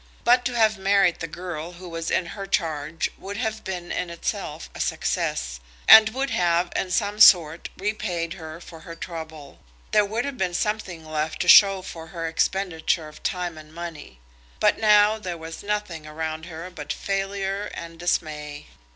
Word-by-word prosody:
But 245 +1 +5
to 245 - -1
have 220 -3 +3
married 195 -3 +3
the 165 - -4
girl 170 0 -6
who 180 +1 -11
was 165 -1 -4
in 185 - +1
her 195 +3 -7
charge 160 -3 -1
would 200 +1 -6
have 220 -2 -3
been 180 -2 -5
in 180 - -2
itself 170 -1 -4
a - - -10
success, - - -1 0.3
and 220 0 +10
would 265 +4 -2
have 175 0 +1
in 190 - -1
some 205 +3 0
sort 170 -6 +6
repaid 185 -5 -2
her 160 -2 -9
for 165 -2 -12
her 165 +1 -10
trouble. 160 -4 -8 0.3
There 210 - +5
would 220 +5 -2
have 280 -4 -5
been 180 -2 0
something 190 -6 -2
left 155 0 -3
to - - -1
show 195 -2 +8
for 165 -3 -8
her 165 -1 -4
expenditure 165 -1 0
of 155 0 -13
time 175 -3 -3
and 155 0 -14
money. 160 - -8 0.4
But - - +3
now 210 0 +5
there 180 -4 -5
was 165 0 -8
nothing 200 -7 -3
around 160 +1 -5
her 170 +1 -8
but 150 -4 -6
failure 195 0 -2
and 165 0 -8
dismay. 150 -4 -2
175 Hz, 175 wpm, -24 LUFS, 160-200 Hz, 0.4 s, and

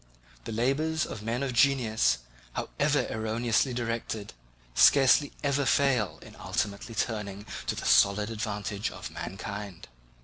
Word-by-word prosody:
The - - -5
labours 140 +8 0
of 105 - -7
men 115 +5 -2
of 130 -2 -2
genius, 120 - +3 0.4
however 145 -2 0
erroneously 115 +3 0
directed, 115 -3 -3 0.4
scarcely 140 - +5
ever 140 0 +1
fail 130 -7 +2
in - - -13
ultimately 105 +3 -3
turning 105 -3 -3 0.2
to - - 0
the - - -6
solid 105 +2 +4
advantage 105 -1 -3
of - - -8
mankind." 100 - -7
115 Hz, 125 wpm, -28 LUFS, 105-135 Hz, 0.4 s, scarcely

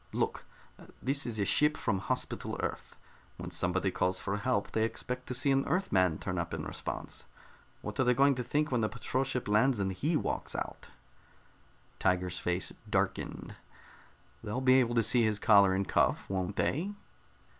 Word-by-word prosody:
Look, - - -1 0.5
this 135 0 +1
is 115 -2 -3
a 100 - +1
ship 150 +7 +3
from 95 - 0
Hospital 95 - -3
Earth. - - -4 0.4
When - - -7
somebody 95 +2 0
calls 90 +1 0
for 100 +2 -2
help, 100 -1 -1
they 110 - +1
expect 125 +3 -3
to 125 - -3
see 135 +2 +2
an 135 0 +3
Earthman 95 - +2
turn - - -3
up - - -3
in - - -5
response. - - -6 0.6
What - - -6
are - - +5
they 125 -1 +3
going 140 +2 +5
to 125 -1 -3
think 150 +5 0
when 120 -3 +1
a 110 - +1
patrol 125 +2 -1
ship 130 -2 -3
lands 110 +4 +3
and 95 -1 0
he 155 - 0
walks - - -3
out?" - - -5 1.1
Tiger's 90 -1 0
face 90 +1 -2 0.2
darkened. - - -2 0.9
"They'll 110 +3 -2
be 130 0 +5
able 120 -2 +1
to 115 - +4
see 120 +3 +4
his 110 -2 +1
collar 100 -3 +5
and 95 0 -1
cuff, - - +1
won't 95 +1 -2
they?" 180 +9 0
115 Hz, 175 wpm, -31 LUFS, 95-130 Hz, 1.1 s, are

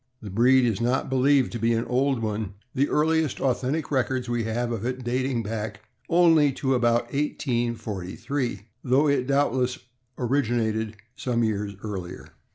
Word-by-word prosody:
The 105 -4 -8
breed 125 +5 +4
is 115 -2 0
not 125 +2 0
believed 135 0 +3
to 120 - -4
be 115 +1 +2
an 115 +1 0
old 130 -1 +1
one, 105 -2 -3 0.2
the 140 +2 +1
earliest 160 -2 +1
authentic 135 +4 -1
records 130 -2 0
we 120 -2 -1
have 120 +2 -1
of 115 -3 -3
it 130 +1 -3
dating 125 0 -1
back 105 0 -4 0.3
only 165 -4 +5
to 135 0 0
about 120 -1 +1
1843, 120 -4 -2 0.2
though 135 +4 +3
it 135 -3 +1
doubtless 130 -3 +1 0.4
originated 115 -4 0 0.2
some 120 -2 -1
years 105 -2 -1
earlier. 95 -4 -6
120 Hz, 150 wpm, -25 LUFS, 110-135 Hz, 0.4 s, only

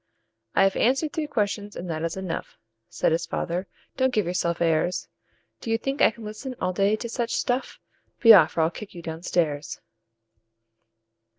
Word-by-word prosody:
"I - - +5
have 195 0 +3
answered 270 +6 +1
three 315 -4 -2
questions, 205 -4 -2
and 180 - -6
that 155 -1 -3
is 165 +2 -3
enough," 185 -3 -5 0.3
Said - - +1
his 165 +1 0
father. 180 +3 -3 0.3
"Don't 260 0 +2
give 215 -6 +1
yourself 170 -1 -1
airs! 165 +1 +1 0.5
Do 230 - -7
you 225 - +2
think 270 +4 -3
I - - +7
can 225 +1 -12
listen 215 +5 -6
all 185 0 -1
day 200 +3 +2
to 235 - -5
such 235 0 -2
stuff? 250 +2 -1 0.4
Be 230 -1 +9
off, 175 -6 +6
or - - +4
I'll 160 +1 +2
kick 200 +3 -10
you 170 - -8
down 160 0 -6
stairs. 150 -5 -1
195 Hz, 185 wpm, -25 LUFS, 170-230 Hz, 0.5 s, Be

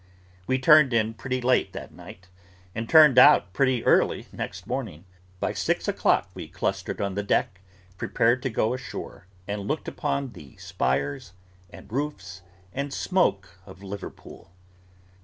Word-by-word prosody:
We 130 - +1
turned 140 -1 +6
in 110 -1 +1
pretty 130 +2 -4
late 125 +1 +1
that - - -8
night, 90 +1 -13 0.5
and 115 +2 -5
turned 150 -5 +7
out 125 -10 +6
pretty 130 0 +1
early - - +3
next - - -6
morning. 80 +5 -5 0.3
By - - -1
six - - -1
o'clock - - +1
we - - -8
clustered - - -3
on 100 -1 -2
the 100 - -2
deck, 100 -1 -1 0.4
prepared 120 +3 +1
to 135 - -2
go 110 0 0
ashore; 125 -7 -8 0.2
and 100 0 -4
looked 155 +2 -3
upon 140 -3 -3
the 70 - -14
spires, 70 +6 -2 0.4
and - - -14
roofs, 100 -10 -4 0.3
and 140 +1 -3
smoke, 100 - -1
of 95 0 -13
Liverpool. 100 -3 -9
115 Hz, 145 wpm, -25 LUFS, 95-130 Hz, 0.5 s, turned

